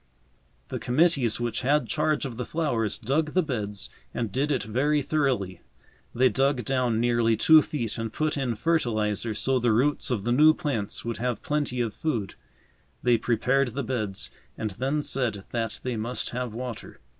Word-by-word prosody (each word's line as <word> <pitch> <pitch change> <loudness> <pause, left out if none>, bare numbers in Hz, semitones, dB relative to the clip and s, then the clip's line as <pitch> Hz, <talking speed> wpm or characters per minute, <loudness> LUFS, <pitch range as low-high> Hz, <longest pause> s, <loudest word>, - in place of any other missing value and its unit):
The - - -3
committees 130 -4 +2
which 120 -1 -2
had 145 +4 +2
charge 155 -1 +1
of 125 -4 -5
the 125 - -2
flowers 120 -8 -1
dug 150 +6 0
the 185 - +4
beds 105 -9 -4 0.2
and 115 -4 -2
did 140 +7 0
it 130 -7 0
very 140 +7 +1
thoroughly. 125 - 0 0.5
They 130 +2 +5
dug 135 +2 +1
down 125 -4 +1
nearly 120 -1 +2
two 160 +7 +7
feet 120 -7 -3
and 115 -1 -3
put 155 +4 -1
in 130 -5 -1
fertilizer 110 -6 0
so 130 +4 +1
the 120 -1 +2
roots 140 +7 +2
of 115 -6 -1
the 120 - 0
new 155 +5 +6
plants 115 -13 -3
would 115 -1 -3
have 120 -2 -2
plenty 145 -4 -1
of 115 -3 -1
food. 110 -11 -2 0.7
They 120 -2 +4
prepared 125 +2 +1
the 140 - -1
beds 110 -6 -3 0.3
and 110 -2 -2
then 135 +9 -1
said 120 -9 -1
that 115 -2 -2
they 125 -3 -2
must 115 +3 -3
have 125 -1 -3
water. 120 0 -7
125 Hz, 175 wpm, -26 LUFS, 115-140 Hz, 0.7 s, two